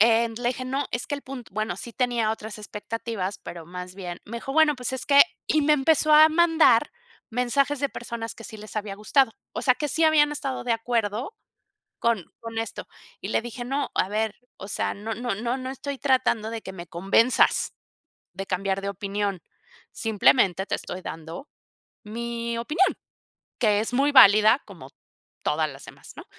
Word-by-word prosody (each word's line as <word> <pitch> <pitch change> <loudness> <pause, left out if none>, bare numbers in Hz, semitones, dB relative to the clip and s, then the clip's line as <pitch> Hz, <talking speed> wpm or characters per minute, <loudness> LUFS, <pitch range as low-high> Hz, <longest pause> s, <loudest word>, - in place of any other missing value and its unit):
eh, 230 +1 +5
le 240 0 -1
dije, 255 0 -5
no, 270 +2 -2
es 240 - -2
que 285 - -2
el 280 - -10
punto 255 -3 -9
bueno, 215 -4 -2
sí 235 +3 -7
tenía 240 -3 0
otras 220 0 -7
expectativas, 210 -1 -5
pero 170 -2 -9
más 180 +1 -8
bien 180 -2 -7
me 235 +3 -7
dijo: 270 +3 -6
"Bueno 305 -2 +4
pues 250 0 -2
es 260 - -3
que 280 0 +8 0.2
"y 310 -1 +2
me 300 +1 +4
empezó 305 +2 +3
a 310 +1 +9
mandar 320 -5 +4 0.4
mensajes 265 +4 +1
de 280 - +1
personas 235 -3 -6
que 230 - -11
sí 220 -1 -8
les 215 +1 -10
había 205 -2 -3
gustado, 225 +4 +2 0.2
o - - -4
sea 255 - +4
que 295 - -3
sí 320 +3 +2
habían 300 -1 +5
estado 275 -3 -3
de 240 - +1
acuerdo 230 - -2 0.6
con 230 -7 +1 0.2
con 230 -1 -6
esto, 225 - -4 0.3
y - - -6
le - - 0
dije: 240 +1 -6
"No, 275 +3 -2
a 185 - +2
ver, 215 0 -1 0.2
o 195 - -8
sea - - -1
no 215 +2 -5
no 240 -1 -2 0.2
no 260 0 -5
estoy 275 +1 -6
tratando 255 -5 +1
de 225 -1 -5
que 190 - -8
me 170 -1 -8
convenzas 195 +8 +2 0.6
de 195 +2 -5
cambiar 195 +1 -1
de 200 - -3
opinión, 200 -1 -3 0.5
simplemente 200 -3 +2
te - - -1
estoy 185 - -7
dando 165 - -8 0.5
mi 235 +1 -4
opinión, 315 +11 +2 0.7
que 210 -4 +3
es 225 - -3
muy 280 +3 +3
válida 215 -1 +7
como 170 -10 -12 0.5
todas 155 +1 0
las 135 -1 -11
demás, - - -13
¿no?" - - -9
230 Hz, 185 wpm, -25 LUFS, 205-265 Hz, 0.7 s, a